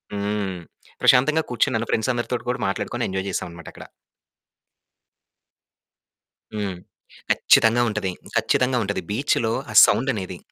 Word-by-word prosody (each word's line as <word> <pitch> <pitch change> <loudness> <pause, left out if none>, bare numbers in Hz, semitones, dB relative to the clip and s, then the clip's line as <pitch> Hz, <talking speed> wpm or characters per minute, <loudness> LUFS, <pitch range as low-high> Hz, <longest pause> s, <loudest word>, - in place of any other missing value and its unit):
హ్మ్. 100 -3 -3 0.4
ప్రశాంతంగా 155 +5 +4
కూర్చున్నాను 115 -2 0
ఫ్రెండ్స్ 110 +3 +1
అందరితో 120 +1 -2
కూడా 125 - -5
మాట్లాడుకొని 100 - -3
ఎంజాయ్ 95 +1 -3
చేసాం - - -3
అన్నమాట 85 0 -11
అక్కడ. - - -12 2.7
హ్మ్. 100 -4 -4 0.5
కచ్చితంగా 115 +2 +4
ఉంటది. 105 -3 -2 0.2
ఖచ్చితంగా 125 0 +1
ఉంటది. 100 0 -3
బీచ్‌లో 115 -1 0 0.2
ఆ - - -7
సౌండనేది. 100 -5 -1
110 Hz, 110 wpm, -22 LUFS, 100-125 Hz, 2.7 s, ప్రశాంతంగా